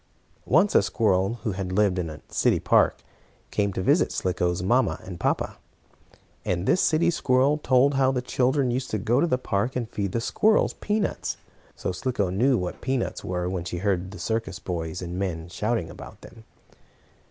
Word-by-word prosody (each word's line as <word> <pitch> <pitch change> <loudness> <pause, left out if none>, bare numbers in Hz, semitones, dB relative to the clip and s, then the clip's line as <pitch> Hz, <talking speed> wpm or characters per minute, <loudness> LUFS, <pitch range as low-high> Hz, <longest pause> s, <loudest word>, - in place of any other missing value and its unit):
Once 180 +9 +4
a - - +6
squirrel 100 -1 +1
who 110 - -1
had 95 -1 -4
lived 95 -1 +2
in 85 -2 -2
a 75 -1 -9
city - - +2
park - - +2 0.5
came 100 -1 0
to 95 -1 -3
visit - - +3
Slicko's 90 -1 -1
mamma 120 +7 +2
and 90 -2 -8
papa. - - -1 0.9
And 90 0 -1
this 185 - +3
city 170 +2 +3
squirrel 140 0 +2
told 135 0 +3
how 135 -1 +3
the 125 -1 -2
children 130 +1 +1
used 130 +2 -2
to 110 - -1
go 120 +7 +1
to 170 - +3
the 125 - +1
park 110 0 -1
and 120 -3 -2
feed 100 -4 -3
the 115 - +1
squirrels 215 - +2
peanuts. 210 0 -2 0.4
So - - -3
Slicko 100 -1 -1
knew 125 +7 +3
what 90 -3 -4
peanuts 130 -1 -2
were, 90 -1 -2
when 90 -2 -3
she 90 - -4
heard 95 -1 -1
the 100 - -9
circus 110 -4 -2
boys 85 -2 -4
and 90 +1 -5
men 85 -4 -3
shouting 105 -3 -2
about - - -11
them. 110 - -14
105 Hz, 185 wpm, -25 LUFS, 90-130 Hz, 0.9 s, a